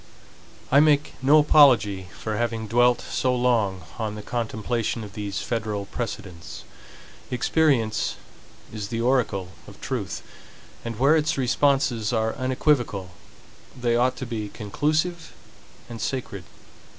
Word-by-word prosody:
I 140 - +7
make 150 -1 +3
no 140 +4 +6
apology 120 -11 +5
for 110 -1 -3
having 115 0 -2
dwelt 120 +3 +3
so 130 -1 -1
long 115 -7 +1 0.2
on 110 -2 -2
the 105 - -8
contemplation 115 0 -2
of 100 -1 -10
these 100 -1 -4
federal 110 -4 -2
precedents. 95 -7 -6 0.7
Experience 125 -3 +1 0.6
is 105 -2 -4
the 115 +2 -3
oracle 115 -7 +1 0.2
of - - -13
truth; - - -4 0.6
and 115 -2 -5
where 140 +6 +4
its 155 -1 +1
responses 125 -3 +1
are 110 -1 0
unequivocal, 130 -7 0 0.7
they 120 -1 +1
ought 125 +2 +2
to 130 - -6
be 110 -3 -4
conclusive 155 - -2 0.5
and 115 -2 -8
sacred. 105 -9 -4
120 Hz, 125 wpm, -24 LUFS, 105-130 Hz, 0.7 s, I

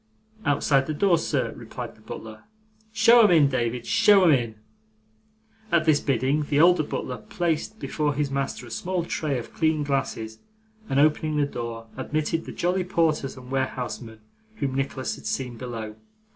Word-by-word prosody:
'Outside 140 -1 +2
the 155 - -2
door, 175 0 +3
sir,' - - -1
replied - - -7
the - - -22
butler. 110 -1 -9 0.5
'Show 230 +2 +6
'em 210 - +6
in, 160 -5 +6
David, 120 -2 -1
show 210 -3 +5
'em 170 - +6
in.' 120 -5 +1 1.2
At 170 -2 +3
this 155 -3 +4
bidding, 135 +2 +1
the 145 0 0
older 175 +1 +6
butler 130 -4 -4
placed 170 - -2
before 150 -2 -1
his 145 -1 -1
master 135 -2 -3
a 120 - -12
small 180 +8 -2
tray 150 -5 -2
of 120 - -7
clean 155 -2 +1
glasses, 130 -6 -2 0.5
and 135 - +2
opening 155 +1 +2
the 145 - +3
door 115 -4 -6
admitted 155 +4 -2
the - - -7
jolly 180 +2 0
porters 160 -7 0
and 125 0 -11
warehousemen 125 -4 -3 0.3
whom 140 -8 -2
Nicholas 135 -1 -2
had - - -8
seen 125 -3 -3
below. 115 -3 -6
145 Hz, 165 wpm, -25 LUFS, 125-165 Hz, 1.2 s, Show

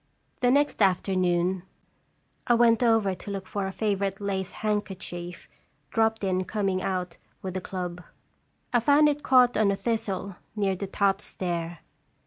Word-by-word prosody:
The 245 - +3
next 285 -1 +2
afternoon 185 -1 +2 0.9
I 240 - +5
went 230 0 +4
over 225 -5 +3
to 185 - -9
look 195 -1 -4
for 200 -1 -2
a - - -4
favorite 200 -2 -1
lace 195 -2 -2
handkerchief, 190 -4 -4 0.4
dropped 225 -1 +1
in 185 -1 +1
coming 195 -3 -1
out 180 -2 -3 0.3
with 185 -1 -4
the 185 - -3
club. 180 -1 -5 0.7
I 240 - +5
found 290 +5 +5
it 295 0 -2
caught 250 -3 +5
on 210 -1 +3
a 200 - +2
thistle, 200 -4 -3 0.2
near 200 -2 +1
the 195 +2 -5
top 195 0 +1
stair. 170 -4 -4
195 Hz, 150 wpm, -27 LUFS, 185-220 Hz, 0.9 s, I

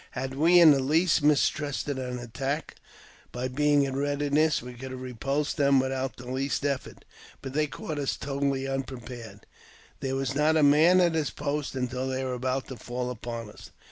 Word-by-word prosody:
Had 130 +1 -4
we 165 +6 +5
in 165 -3 +9
the 140 - +4
least 155 +5 +2
mistrusted; 145 -1 +1
an 125 -1 -4
attack, 135 +6 -4 0.6
by 125 +1 -3
being 145 +2 +2
in 135 -1 -2
readiness 145 +1 +1
we 125 +1 -9
could 130 +2 -8
have 130 0 -7
repulsed 135 +5 -2
them 140 -2 +4
without 130 0 -2
the 125 - -10
least 135 +3 -2
effort. 140 -2 -3 0.4
But 135 - -6
they 150 +1 +1
caught 150 +2 -5
us 140 - -1
totally 140 -1 -1
unpre 135 -3 -4
pared; 115 -5 -10 0.5
there 135 0 -2
was 135 0 -1
not 150 +3 +3
a 155 - +4
man 160 +6 +6
at 170 -2 +3
his 155 -3 0
post 145 -1 -3
until 130 0 -2
they 130 0 -2
were 130 -1 -2
about] 130 +2 -2
to 130 - -7
fall 125 +2 -4
upon 115 -2 -6
us. - - -13
135 Hz, 190 wpm, -27 LUFS, 130-145 Hz, 0.6 s, in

